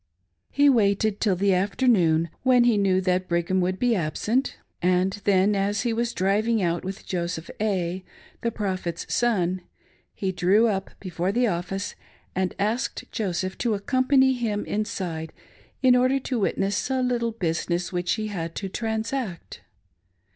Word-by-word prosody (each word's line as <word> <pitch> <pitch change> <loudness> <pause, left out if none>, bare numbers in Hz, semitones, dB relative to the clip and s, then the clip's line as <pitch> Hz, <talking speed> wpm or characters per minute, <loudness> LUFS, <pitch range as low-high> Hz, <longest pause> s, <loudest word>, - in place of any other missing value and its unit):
He 285 0 +3
waited 210 -4 +3
till 200 -4 +2
the 195 +2 +2
afternoon 185 -5 +2
when 250 -2 +5
he 240 -2 +4
knew 195 -2 +2
that 185 0 0
Brigham 170 +2 +1
would 185 +1 0
be 245 +3 +2
absent, 210 - -1 0.2
and 180 +1 +2
then 200 +1 +4
as 200 +1 0
he 235 -2 0
was 235 +1 -1
driving 215 +4 +1
out 170 -3 0
with 190 +1 -6
Joseph 170 -2 -3
A.f 190 -4 -1 0.4
the 235 - 0
Prophet's 185 -6 -3
son, 185 -6 +1 0.5
he 190 -1 -1
drew 190 +5 +3
up 195 -3 -1
before 180 0 -2
the 245 +4 +2
office 195 0 -2 0.4
and 185 0 -1
asked 215 +6 -2
Joseph 185 -4 -2
to 230 -3 +1
accompany 260 +4 +3
him 225 -5 -2
inside 180 -6 -3 0.5
in 255 -1 +6
order 255 +2 +3
to 250 -2 -2
witness 195 +2 0
a 260 -1 +1
little 235 -2 0
business 170 -2 -2
which 175 0 0
he 215 -1 -2
had 165 -5 -5
to 195 - -4
transact. 220 -2 -4
200 Hz, 150 wpm, -25 LUFS, 180-230 Hz, 0.5 s, in